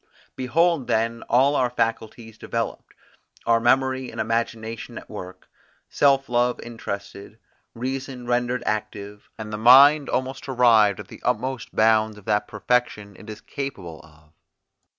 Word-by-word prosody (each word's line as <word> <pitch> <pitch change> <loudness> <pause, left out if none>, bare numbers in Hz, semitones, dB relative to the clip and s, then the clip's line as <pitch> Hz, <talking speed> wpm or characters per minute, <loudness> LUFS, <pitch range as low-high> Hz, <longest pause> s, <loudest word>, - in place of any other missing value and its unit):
Behold 150 +3 +1
then 115 +1 0
all 135 +4 +3
our 125 -3 +1
faculties 115 -1 -3
developed; 115 +1 -5 0.5
our 115 0 +3
memory 130 +2 +1
and - - -9
imagination 115 +1 -3
at - - -10
work, 95 -3 -9 0.4
self 135 -1 +2
love 120 0 +1
interested; 100 -2 -8 0.4
reason 130 +1 -5
rendered 120 0 -1
active; 105 -1 -5
and 110 -1 -7
the 105 - -4
mind 140 +5 +7
almost 130 +1 -3
arrived 115 -5 +4
at - - -9
the - - -13
utmost 125 +2 -2
bounds 110 -1 +3
of 105 - -15
that 105 - 0
perfection 110 -2 -1
it 110 - -13
is 105 0 -9
capable 95 - -7
of. 75 -1 -22
115 Hz, 135 wpm, -23 LUFS, 110-130 Hz, 0.5 s, mind